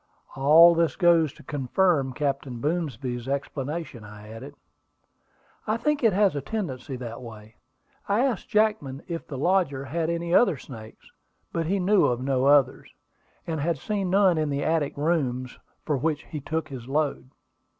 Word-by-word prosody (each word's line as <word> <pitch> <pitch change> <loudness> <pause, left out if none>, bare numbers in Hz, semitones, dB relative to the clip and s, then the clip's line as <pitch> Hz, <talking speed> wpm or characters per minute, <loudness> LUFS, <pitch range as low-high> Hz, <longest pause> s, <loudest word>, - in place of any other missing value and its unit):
"All 155 +5 +7
this 165 -1 +1
goes 170 -5 +4
to - - -16
confirm 145 0 0
Captain 135 -2 -3
Boomsby's 130 -5 -3
explanation," 140 -1 -4
I 105 0 -12
added. 115 +1 -10 1.1
"I 215 +1 +1
think 300 +2 -1
it 225 - +5
has 200 -2 +2
a 145 - -2
tendency 140 - -4
that 120 -2 -7
way. 110 -2 -12 0.5
I 215 +6 +3
asked 245 -7 -2
Jackman 210 -11 0
if 170 -2 -5
the 140 - -6
lodger 145 -4 +1
had 160 +4 -2
any 170 0 -2
other 185 - +4
snakes; 110 -4 -12 0.4
but 165 -1 -1
he 195 +4 +1
knew 195 +2 +3
of 120 -1 +1
no 130 0 0
others, 140 -2 +3 0.5
and 160 -2 -3
had 165 +1 0
seen 195 +5 -2
none 190 -3 +4
in 155 -1 0
the 140 0 -2
attic 160 -4 0
rooms 135 -5 -1 0.3
from 145 -5 -1
which 155 -1 -1
he 150 - -7
took 160 +2 -3
his 125 -4 -8
load. 145 -2 -1
150 Hz, 160 wpm, -25 LUFS, 130-170 Hz, 1.1 s, All